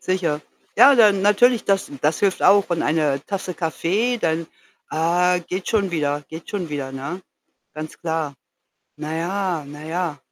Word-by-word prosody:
Sicher. 170 -5 -1 0.4
Ja, 280 - +8
dann 210 -5 +5
natürlich, 225 +4 +4
das 195 -1 0
das 150 +1 +1
hilft 195 -2 +1
auch. 200 -2 +5
Und 170 - 0
eine 150 -3 +1
Tasse 190 -2 -4
Kaffee, 190 +9 -1
dann, 165 -4 -1 0.4
ah, 175 +3 +2
geht 180 +2 -5
schon 200 -4 +1
wieder 145 -3 -1
geht 160 +1 -9
schon 190 -5 -3
wieder, 140 -3 -4
ne? 140 +8 -5 0.6
Ganz 155 0 -7
klar. 160 -4 -2 0.6
Na 155 +1 -5
ja 175 -1 -2
na 150 +1 -10
ja. 165 -1 -3
170 Hz, 155 wpm, -22 LUFS, 155-195 Hz, 0.6 s, Ja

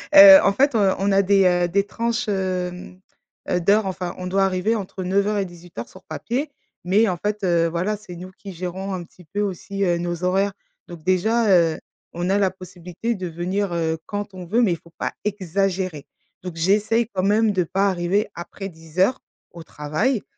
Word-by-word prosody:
heu, 295 -1 +12
en 200 - +4
fait, 275 +6 +3
heu, 200 -3 +3
on 200 +1 +1
a 195 0 +5
des, 195 0 +4
heu, 175 -1 +3
des 200 +3 +1
tranches, 230 +2 -2
hem, 185 -2 -3 0.5
heu, 180 - +2
d'heures, 205 +4 +3
enfin 185 -2 -4
on 180 - -6
doit 195 +1 +2
arriver 190 +4 0
entre 190 -2 -5
09:00 200 +3 +1
et 200 - 0
18:00 175 -9 -10
sur 190 - -15
papier, 270 +6 -3 0.3
mais 200 +6 +3
en 180 - -2
fait, 210 +3 -3
heu, 170 -2 +3
voilà, 175 +6 -1
c'est 195 -4 -11
nous 185 +2 -9
qui 195 +1 -10
gérons 185 +3 -5
un 180 -2 -4
petit 180 +1 -18
peu 205 +6 -3
aussi, 200 0 -3
heu, 175 -2 +2
nos 175 0 -3
horaires, 195 +2 +1 0.3
donc 170 -3 -10
déjà, 215 +6 +2
heu, 165 -3 +4 0.3
on 175 +2 -2
a 200 - +3
la 195 -2 +3
possibilité 185 +3 -5
de 185 -2 -5
venir, 180 +3 -2
heu, 160 -1 -1
quand 205 -1 -4
on 185 -1 -8
veut, 225 +7 +2
mais 205 - +3
il - - -4
faut 170 +1 -20
pas - - -3
exagérer, 190 -5 -2 0.4
donc 180 -2 -6
j'essaye 210 +7 +2
quand 185 -1 -1
même 210 +2 +3
de 185 -3 +1
pas 195 +4 +1
arriver 190 +4 0
après 195 +3 -7
10:00 175 +8 0 0.3
au 170 - -10
travail, 160 - -1
190 Hz, 200 wpm, -22 LUFS, 175-205 Hz, 0.5 s, heu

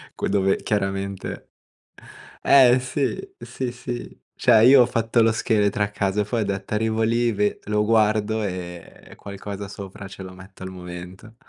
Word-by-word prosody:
que - - -2
dove 95 -1 +2
chiaramente 100 -1 -3 1.0
Eh 130 -2 +7
sì, 130 +2 -2 0.2
sì, 130 - -5
sì. 125 0 -7 0.2
Cioè 110 0 +5
io 130 0 +8
ho - - +3
fatto 115 0 0
lo 115 0 +4
scheletro 105 -2 +1
a 100 - +1
casa, 100 0 -1
poi 110 +2 -2
ho - - 0
detto: 100 0 -4
“Arrivo 110 +1 0
lì, 115 +1 +2
ve 105 0 0
lo 105 0 0
guardo, 110 0 +2
ehm, 90 -3 -7
e - - -11
qualcosa 100 0 -7
sopra 100 0 -9
ce 95 0 -10
lo 95 0 -9
metto 95 0 -14
al 95 - -6
momento.” 90 +4 -10
105 Hz, 165 wpm, -23 LUFS, 95-115 Hz, 1.0 s, io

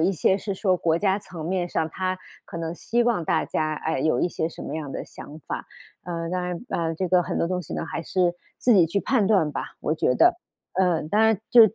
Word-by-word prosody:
一 180 +4 +3
些 190 +2 +3
是 200 0 -3
说 185 -2 +2
国 165 -1 +1
家 195 0 +2
层 170 -5 -8
面 180 -1 0
上， 160 -1 0
它 185 +1 -2 0.3
可 170 - -7
能 165 0 -3
希 240 +6 0
望 230 -9 +1
大 160 0 +1
家， 155 0 -1
哎， 160 -1 -2
有 155 +4 +2
一 180 - +2
些 160 - -2
什 - - -10
么 - - -4
样 145 -4 -5
的 - - -4
想 150 +2 -11
法。 - - -5 0.4
呃， 170 -1 -3
当 180 0 -1
然， 175 -1 -3
呃， 165 -1 -1
这 180 +2 -2
个 180 0 +4
很 - - -2
多 170 - +1
东 180 -1 -1
西 - - -9
呢， - - -2
还 165 - -4
是 175 0 +1 0.2
自 245 - +4
己 175 -4 +6
去 200 +5 0
判 230 -5 +2
断 190 -8 +3
吧， - - -6
我 155 - 0
觉 125 -5 +2
得。 350 0 +5 0.4
呃， 180 -4 +2
当 210 +4 +2
然， 220 -2 +4
就 245 - +8
是 220 0 +5
180 Hz, 270 characters per minute, -25 LUFS, 160-195 Hz, 0.4 s, 就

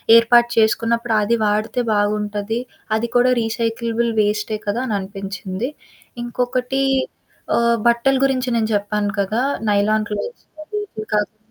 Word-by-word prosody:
ఏర్పాటు 235 +1 +6
చేసుకున్నప్పుడు 230 +1 +2
అది 230 +3 +2
వాడితే 215 +4 0
బాగుంటది, 210 +1 -1 0.4
అది 235 +1 -2
కూడా 250 +1 +5
రీసైకలబుల్ 230 +1 -1
వేస్టే 210 +1 0
కదా! 225 +5 0
అననిపించింది. 195 +2 -4 0.5
ఇంకొకటి 250 +2 -1 0.7
ఆహ్, 235 0 +3
బట్టల 235 +3 +2
గురించి 260 -1 0
నేను 220 -1 0
చెప్పాను 205 0 -1
కదా! 215 +6 0 0.3
నైలాన్ 210 +1 +2
క్లోత్స్ 465 - -5 0.2
అవి, 420 +6 -4 0.2
ఇవి 215 0 -6
కాకుండా 210 +1 0
225 Hz, 120 wpm, -20 LUFS, 210-235 Hz, 0.7 s, ఏర్పాటు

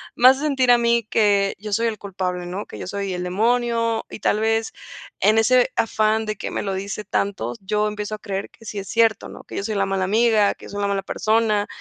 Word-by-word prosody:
me 250 - +6
hace 265 +1 +5
sentir 265 -5 +2
a 240 - +7
mí 235 0 +2
que 200 -2 +2
yo 210 0 -7
soy 230 +3 +1
el 220 - -2
culpable, 185 -2 -4
¿no?, 190 +4 -5
que - - -10
yo - - -5
soy 200 -1 -3
el 180 0 -3
demonio 230 +4 0
y, - - -8
tal 210 - +1
vez 225 0 0 0.5
en 215 +1 +4
ese 225 +3 +3 0.2
afán 220 0 +1
de 215 0 -3
que 195 - -5
me - - -3
lo 195 - -2
dice 200 +2 -4
tanto, 180 - -2
yo 210 +2 0
empiezo 210 0 -4
a - - -12
creer 195 -1 -4
que 225 - -19
sí 205 - -5
es 195 - -7
cierto, 225 -3 +2
¿no?, - - -11
que - - -11
yo - - -2
soy 215 +1 -3
la 195 -1 +1
mala 195 -1 -1
amiga, 220 0 +3
que - - -14
yo - - -10
soy 205 0 -4
la 200 - +1
mala 195 -1 -1
persona, 215 -1 +1
210 Hz, 250 wpm, -22 LUFS, 200-225 Hz, 0.5 s, a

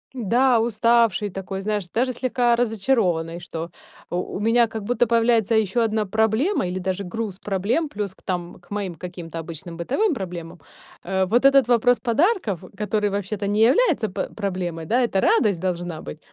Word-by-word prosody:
Да, 245 +2 +3
уставшей 230 -3 +2
такой, 195 +1 -5
знаешь, 205 -3 -2
даже 255 +5 0
слегка 245 -1 +1
разочарованный, 200 -8 0
что 170 -1 -6 0.4
у 180 +1 -3
у - - -3
меня 230 +2 +3
как 220 -1 -6
будто 245 +2 +1
появляется 230 -1 +3
ещё 220 +1 +2
одна 220 -1 +1
проблема 220 - +1
или 180 +1 -3
даже 190 +1 -2
груз 200 0 -5
проблем 210 - -1
плюс 205 -6 -4
к - - -26
там 175 -2 -4
к 175 - -25
моим 200 -4 -3
каким-то 170 -1 -7
обычным 165 +1 -8
бытовым 275 - 0
проблемам. 175 - -6 0.4
Э, 190 +1 0
вот 240 +7 +2
этот 275 -3 +6
вопрос 245 0 +3
подарков, 240 - +1
который 210 0 0
вообще-то 200 +1 -3
не 205 +2 +1
является 265 - +4
п - - -4
проблемой, 180 -5 -3
да, 240 +10 +2
это 210 -5 +1
радость 210 - +3
должна 175 -3 -3
быть, 75 - -8
210 Hz, 170 wpm, -23 LUFS, 180-235 Hz, 0.4 s, этот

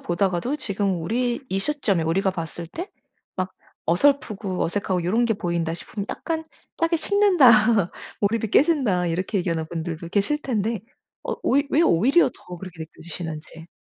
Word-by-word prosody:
보다가도 185 - 0
지금 200 - -1
우리 240 +6 0
이 195 - 0
시점에 205 - +1
우리가 190 +4 +1
봤을 170 -1 -5
때 350 - -6 0.5
막 185 0 -2 0.3
어설프고 210 - +1
어색하고 185 0 -1
요런 225 +7 +2
게 225 -2 +1
보인다 170 -3 -1
싶으면 200 +3 -6
약간 320 -1 -3 0.3
"짜게 330 0 +1
식는다. 245 - +5 0.3
몰입이 220 +1 +1
깨진다." 255 - +3
이렇게 185 +4 -1
얘기하는 165 -3 -1
분들도 165 0 -5
계실 210 - +1
텐데 225 -5 -1 0.4
어 - - -2
왜 280 +2 +4
왜 320 - +4
오히려 275 - +4
더 180 - -10
그렇게 180 -3 -10
느껴지시는지. 160 0 -7
195 Hz, 345 characters per minute, -24 LUFS, 170-250 Hz, 0.5 s, 식는다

